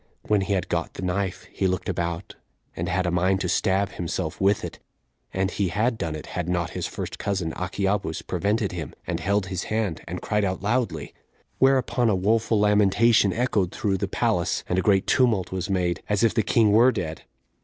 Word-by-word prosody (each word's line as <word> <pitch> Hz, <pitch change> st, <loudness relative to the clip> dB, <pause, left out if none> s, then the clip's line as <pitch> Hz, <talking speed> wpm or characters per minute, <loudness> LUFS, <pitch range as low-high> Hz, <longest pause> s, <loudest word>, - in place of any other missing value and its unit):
When 105 Hz, -2 st, +2 dB
he 95 Hz, +1 st, -1 dB
had 95 Hz, -3 st, -1 dB
got -, -, -2 dB
the -, -, -6 dB
knife, 95 Hz, +1 st, -2 dB
he 95 Hz, -, 0 dB
looked 95 Hz, 0 st, -2 dB
about, 85 Hz, 0 st, -3 dB, 0.4 s
and 85 Hz, +1 st, -3 dB
had 90 Hz, 0 st, 0 dB
a 90 Hz, -, 0 dB
mind 95 Hz, +2 st, +2 dB
to 90 Hz, -, -1 dB
stab 95 Hz, +1 st, +1 dB
himself 85 Hz, -1 st, -4 dB
with 100 Hz, +1 st, +2 dB
it; -, -, -8 dB, 0.5 s
and 95 Hz, 0 st, -1 dB
he 100 Hz, 0 st, 0 dB
had 110 Hz, +6 st, 0 dB
done 80 Hz, -2 st, -2 dB
it, 75 Hz, -, -7 dB
had 90 Hz, -1 st, -2 dB
not 85 Hz, -2 st, -1 dB
his -, -, -3 dB
first -, -, -6 dB
cousin, 95 Hz, -5 st, -2 dB
Achiabus, 95 Hz, -1 st, -2 dB
prevented 105 Hz, 0 st, 0 dB
him, 85 Hz, -6 st, -6 dB
and -, -, -2 dB
held 100 Hz, 0 st, +1 dB
his 90 Hz, 0 st, -4 dB
hand, 110 Hz, -7 st, -1 dB
and 90 Hz, +2 st, -4 dB
cried 105 Hz, -1 st, 0 dB
out 95 Hz, -1 st, -2 dB
loudly. 105 Hz, -, -1 dB, 0.5 s
Whereupon 130 Hz, -3 st, +3 dB
a 105 Hz, -, +3 dB
woeful 110 Hz, +3 st, +2 dB
lamentation 105 Hz, +1 st, +4 dB
echoed 110 Hz, -6 st, 0 dB
through 100 Hz, -6 st, -1 dB
the -, -, -1 dB
palace, -, -, 0 dB
and 90 Hz, -, +1 dB
a -, -, +2 dB
great 95 Hz, 0 st, +3 dB
tumult 120 Hz, -9 st, +2 dB
was 95 Hz, 0 st, -3 dB
made, 90 Hz, -3 st, 0 dB
as 105 Hz, +1 st, +1 dB
if 115 Hz, -, +4 dB
the 115 Hz, -, +2 dB
king 110 Hz, +1 st, +3 dB
were 120 Hz, +5 st, +6 dB
dead. 80 Hz, -8 st, -4 dB
95 Hz, 200 wpm, -25 LUFS, 90-105 Hz, 0.5 s, were